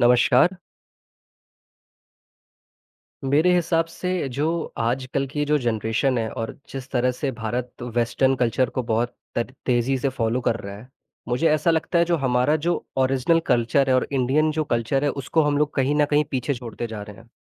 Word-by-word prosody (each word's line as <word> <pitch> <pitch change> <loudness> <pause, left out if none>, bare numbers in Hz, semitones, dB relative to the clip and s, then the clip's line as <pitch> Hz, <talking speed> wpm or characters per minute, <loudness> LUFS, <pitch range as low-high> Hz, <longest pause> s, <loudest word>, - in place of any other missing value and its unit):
नमस्कार। 125 +8 +4 2.7
मेरे 150 +7 +3
हिसाब 165 -1 +2
से 180 -2 -3
जो 140 +4 -1 0.3
आजकल 130 +4 -1
की 145 +2 -2
जो 150 +1 +3
जनरेशन 120 +1 0
है 110 -1 -1
और 115 - -4 0.2
जिस 135 -1 -7
तरह 125 -1 +2
से 135 +2 -3
भारत 120 +2 -5
वेस्टर्न 120 +2 +1
कल्चर 125 +1 +1
को 130 - -2
बहुत 120 +2 0 0.2
तर 120 +2 -2
तेज़ी 125 +1 +2
से 135 - 0
फॉलो 125 -2 -1
कर 115 - 0
रहा 100 0 -7
है, 110 +5 -13 0.4
मुझे 125 +7 +2
ऐसा 155 +2 +2
लगता 165 +2 +1
है 170 - +5
जो 170 0 +1
हमारा 130 +1 +2
जो 175 -1 0
ओरिजिनल 135 +5 +2
कल्चर 120 +3 +2
है - - +4
और 130 - +1
इंडियन 140 +4 +2
जो 155 0 -1
कल्चर 125 +2 0
है, 145 - +2
उसको 140 +4 0
हम 145 -1 +1
लोग 150 0 0
कहीं 135 +1 +1
न - - +5
कहीं 150 0 +3
पीछे 130 +1 -1
छोड़ते 120 -1 -6
जा 110 -2 -7
रहे 105 -1 -10
हैं। 115 +1 -17
130 Hz, 180 wpm, -23 LUFS, 120-145 Hz, 2.7 s, है